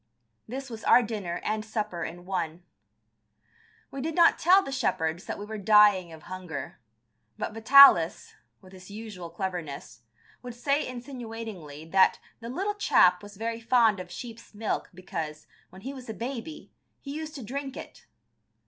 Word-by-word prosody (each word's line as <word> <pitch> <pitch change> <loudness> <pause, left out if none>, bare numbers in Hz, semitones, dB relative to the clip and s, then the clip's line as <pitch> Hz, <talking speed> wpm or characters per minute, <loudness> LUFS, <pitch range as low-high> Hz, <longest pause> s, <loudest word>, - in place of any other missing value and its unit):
This 265 +2 -6
was 220 -2 -8
our 250 - +6
dinner 205 -6 -4
and 215 0 -1
supper 210 -6 -3
in 175 +2 -7
one. 175 -2 -3 1.3
We 275 - -5
did 315 +2 -3
not 340 -1 +5
tell 375 +4 +6
the 275 - -6
shepherds 165 -9 -1
that - - -5
we 205 - -7
were 215 0 -6
dying 205 -4 +5
of 160 -1 -12
hunger, 175 -7 -7 0.6
but - - -4
Vitalis, 225 -7 +6 0.3
with 185 0 -16
his 185 0 -13
usual 205 -5 -8
cleverness, 170 -8 -6 0.4
would 245 -2 -8
say 280 +4 0
insinuatingly 225 - -8
that 190 -1 +5 0.2
"the 230 0 -8
little 390 +11 -2
chap 180 - +4
was 205 -1 -12
very 230 +1 -3
fond 230 -4 +3
of 180 -1 -8
sheep's 225 +4 -10
milk, 215 +1 -2
because, 165 -5 -6 0.2
when 190 +1 -14
he 270 +3 -5
was 255 -3 -10
a 220 - -5
baby, 260 +5 -6 0.3
he 280 - -7
used 310 +1 -6
to 270 - -7
drink 270 +4 -5
it." - - -11
215 Hz, 160 wpm, -27 LUFS, 180-250 Hz, 1.3 s, our